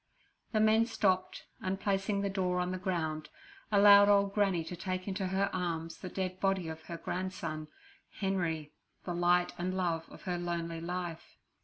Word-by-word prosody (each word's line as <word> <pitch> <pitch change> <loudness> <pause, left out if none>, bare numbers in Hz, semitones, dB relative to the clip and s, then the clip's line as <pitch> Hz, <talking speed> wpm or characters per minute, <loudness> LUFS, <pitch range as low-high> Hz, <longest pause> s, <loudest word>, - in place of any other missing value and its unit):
The 215 - +2
men 220 +1 +4
stopped, 190 -5 0 0.2
and, 190 +1 -2
placing 200 0 0
the 200 - 0
door 180 -2 0
on 180 0 -1
the 185 - -3
ground, 160 -4 -2 0.4
allowed 205 0 +8
old 200 -1 +4
Granny 195 -5 +2
to 165 +3 -6
take 185 +1 -4
into 190 -1 -2
her 190 +2 +1
arms 165 -3 -2
the 185 - -6
dead 185 0 -3
body 195 -3 +1
of 160 0 -7
her 170 - -6
grandson, 165 -3 -4 0.5
Henry, 170 -6 -2 0.3
the 175 - -3
light 175 +1 +3
and 185 +2 -1
love 165 -3 -1
of - - -13
her 180 -2 -2
lonely 170 -1 -3
life. 175 -1 -5
185 Hz, 170 wpm, -32 LUFS, 170-195 Hz, 0.5 s, allowed